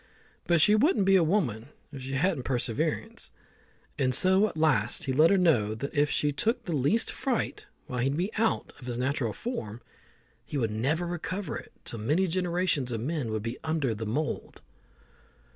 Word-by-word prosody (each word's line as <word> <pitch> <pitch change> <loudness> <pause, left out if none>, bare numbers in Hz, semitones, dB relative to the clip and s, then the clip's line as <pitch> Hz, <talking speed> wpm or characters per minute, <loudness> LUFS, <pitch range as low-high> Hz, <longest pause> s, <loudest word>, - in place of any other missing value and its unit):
But 170 -1 +4
she 210 - +6
wouldn't 215 - +3
be 195 0 +5
a 185 - +5
woman 145 - 0 0.2
if 135 - -7
she 135 +1 -5
hadn't 160 +1 +1
perseverance; 120 -3 -2 0.7
and 130 -2 +2
so 190 +7 +4
at 160 - -8
last 130 -8 +2
he 135 - -1
let 155 +5 +6
her 200 - +4
know 120 - +3
that 140 +6 -5
if 145 0 +2
she 150 - +1
took 230 - -1
the 175 - -3
least 145 - +1
fright 255 -4 -2 0.2
while 125 - -4
he'd 135 +4 0
be 185 +5 -1
out 225 0 0
of 125 - -10
his 120 -1 -3
natural 130 -2 0
form, 115 - -5 0.6
he 145 - -5
would 115 -5 0
never 140 +11 0
recover 180 +3 -4
it - - -8
till 115 - -6
many 150 - +2
generations 175 -6 0
of 115 - -2
men 140 -2 -2
would 110 -1 -2
be 115 +2 -4
under 155 -6 0
the 110 0 -5
mould. 145 +8 -3
145 Hz, 185 wpm, -28 LUFS, 125-185 Hz, 0.7 s, she